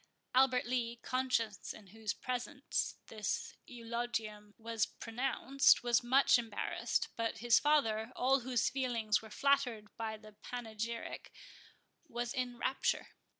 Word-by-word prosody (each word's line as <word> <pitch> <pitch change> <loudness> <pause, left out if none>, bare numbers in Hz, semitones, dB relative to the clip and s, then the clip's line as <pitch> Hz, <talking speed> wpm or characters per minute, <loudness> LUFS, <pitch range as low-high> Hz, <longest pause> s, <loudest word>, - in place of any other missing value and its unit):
Albert 255 -1 +4
Lee, 240 -1 -1
conscious 250 -5 -1
in 215 - -13
whose 215 +2 -4
presence 255 +3 -2
this 215 -2 -3
eulogium 225 -3 -4
was 225 -1 -1
pronounced, 265 +4 +2
was 240 -1 +3
much 260 +1 +5
embarrassed; 225 -3 -1
but 230 -1 -1
his 235 +1 +5
father, 235 -7 +2
all 265 +2 +3
whose 250 -1 +1
feelings 235 -5 +1
were 220 - -11
flattered 245 -4 +1
by 220 -1 -3
the 215 0 -14
panegyric, 230 -1 -5 0.8
was 240 -2 -3
in 250 -1 -2
rapture. 260 +2 0
235 Hz, 120 wpm, -34 LUFS, 220-255 Hz, 0.8 s, much